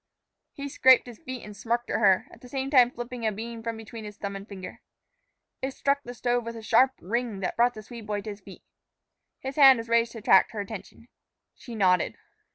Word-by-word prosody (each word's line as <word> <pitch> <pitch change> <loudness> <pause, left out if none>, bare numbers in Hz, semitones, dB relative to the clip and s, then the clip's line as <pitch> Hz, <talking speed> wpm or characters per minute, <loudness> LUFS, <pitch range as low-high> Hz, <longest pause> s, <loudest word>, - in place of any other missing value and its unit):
He 280 0 -6
scraped 260 -2 +5
his 240 -3 -11
feet 255 -2 -7
and 210 -1 -10
smirked 235 +3 -2
at - - 0
her, 195 -4 +4
at 230 - -16
the 250 - -13
same 270 +1 -3
time 250 -4 +6
flipping 240 0 -7
a 220 - +1
bean 230 +2 -7
from 230 0 -4
between 225 0 -9
his 210 -1 -9
thumb 200 -1 -5
and 195 +2 -9
finger. 190 -2 -9 0.8
It 265 0 -3
struck 280 0 +1
the 245 -2 -9
stove 245 +1 0
with 230 0 -6
a 225 - -9
sharp 255 +4 +4
ring 230 +1 -2
that 185 - -2
brought 245 +1 +3
the 215 - -9
Swede 230 -1 -10
boy 205 -1 -2
to 215 +1 -6
his 205 0 -11
feet. 190 0 -13 0.8
His 265 +2 -6
hand 270 -3 +8
was 230 0 -6
raised 230 0 +2
to - - -8
attract 195 -2 +4
her 215 - -5
attention. 210 +3 -8 0.5
She 235 - -10
nodded. 185 -4 +2
230 Hz, 225 wpm, -27 LUFS, 210-245 Hz, 0.8 s, hand